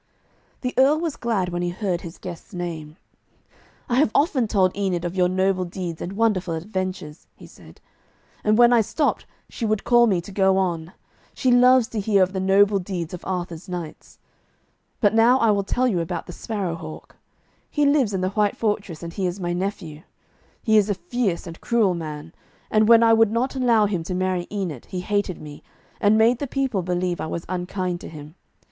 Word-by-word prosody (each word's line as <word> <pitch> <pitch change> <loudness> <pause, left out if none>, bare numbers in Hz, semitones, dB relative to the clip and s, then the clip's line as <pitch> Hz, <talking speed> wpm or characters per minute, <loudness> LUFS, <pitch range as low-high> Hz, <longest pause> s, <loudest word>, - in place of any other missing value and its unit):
The 250 -1 -2
Earl 285 +4 +5
was 330 -3 -2
glad 210 -7 -1
when 175 0 -3
he 175 - -1
heard 180 -1 -2
his 170 -1 -9
guest's 180 +2 -9
name. 165 -3 -6 0.9
'I 240 - 0
have 275 -5 +3
often 280 -6 +2
told 190 -4 +2
Enid 185 -3 -1
of 175 +1 -4
your 180 -1 +3
noble 185 0 +1
deeds 175 -2 -6
and 180 - -5
wonderful 195 -6 0
adventures,' 185 -3 -5
he - - -14
said, - - -16 0.6
'and 215 0 +3
when 240 0 +6
I 235 - +5
stopped, 290 +7 -1 0.2
she - - -8
would 215 -2 0
call 240 -1 +5
to - - +2
me 185 -4 +2
to 175 +4 -9
go 190 -1 +3
on. 175 -2 -2 0.4
She 255 - +1
loves 250 -1 +5
to 225 - -3
hear 200 -1 +3
of 185 +1 -2
the 190 - -2
noble 195 +1 +4
deeds 180 -3 -5
of 180 - -7
Arthur's 180 -1 -4
knights. 175 -3 -7 0.8
But 205 -2 +4
now 230 +3 +5
I 230 -4 +3
will 200 -1 +2
tell 250 +6 0
you 195 -8 0
about 165 - -3
the 175 - -9
Sparrow 200 -5 -3
hawk. 155 -1 -10 0.5
He 295 -1 +1
lives 280 -6 +3
in 190 -2 -2
the 185 - 0
white 205 +1 0
fortress, 205 -7 -2
and 170 0 -6
he 190 0 -1
is 180 +2 -4
my 175 -1 -2
nephew. 175 -4 -4 0.6
He 220 -2 +4
is 210 0 +3
a 205 - +1
fierce 190 +1 -2
and 165 -1 -10
cruel 225 -6 +2
man, 155 -1 -7 0.4
and 215 0 +4
when 230 0 +7
I 225 0 +5
would 225 -1 +5
not 245 +4 -1
allow 235 -5 +3
him 195 -4 -1
to 180 - -3
marry 185 -1 -1
Enid, 185 - -4
he 180 - -4
hated 205 -2 -1
me, 150 -1 -10 0.4
and 210 +1 +4
made 230 +2 +4
the 285 - -3
people 260 -7 -1
believe 180 0 -2
I - - -3
was 170 +1 -5
unkind 180 -1 -3
to - - -8
him. 150 -1 -11
190 Hz, 205 wpm, -23 LUFS, 175-225 Hz, 0.9 s, when